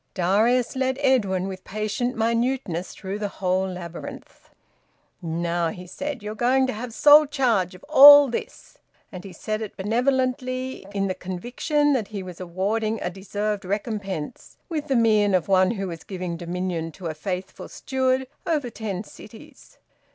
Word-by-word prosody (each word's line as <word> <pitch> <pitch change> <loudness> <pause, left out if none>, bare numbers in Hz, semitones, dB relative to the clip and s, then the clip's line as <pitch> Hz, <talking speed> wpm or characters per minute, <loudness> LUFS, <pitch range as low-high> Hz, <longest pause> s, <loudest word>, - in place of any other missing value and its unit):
Darius 220 +8 +2
led 260 0 0
Edwin 200 -9 +2
with 190 -1 -7
patient 215 +4 -2
minuteness 230 -6 -1
through 195 +2 -5
the 210 - -1
whole 190 -1 -1
labyrinth. 175 -2 -9 0.7
"Now," 170 0 -1
he 180 +2 -8
said, 275 +5 -6
"you're 210 +1 -4
going 255 +4 +2
to 260 - -2
have 230 +3 -6
sole 295 +5 +7
charge 230 - +1
of 185 - -15
all 290 -1 +10
this." 240 - -7 0.3
And 185 -3 -8
he 195 - -9
said 215 +5 -4
it 215 - -7
benevolently, 255 +2 -1
in 195 -1 -1
the 190 - -1
conviction 245 - -1
that 230 -7 -1
he 200 -3 -6
was 180 -2 -9
awarding 205 +5 -2
a 180 - -3
deserved 205 +2 -3
recompense, 195 -4 -4
with 305 -3 -3
the 270 - +1
mien 215 -4 +3
of 175 -4 0
one 185 -1 +4
who 195 -4 -3
was 165 -1 -8
giving 180 -3 -5
dominion 170 -1 -3
to 185 - -11
a 160 - -2
faithful 180 +4 -5
steward 260 0 -1 0.2
over 295 -7 0
ten 210 -4 -4
cities. - - -15
210 Hz, 160 wpm, -24 LUFS, 185-255 Hz, 0.7 s, all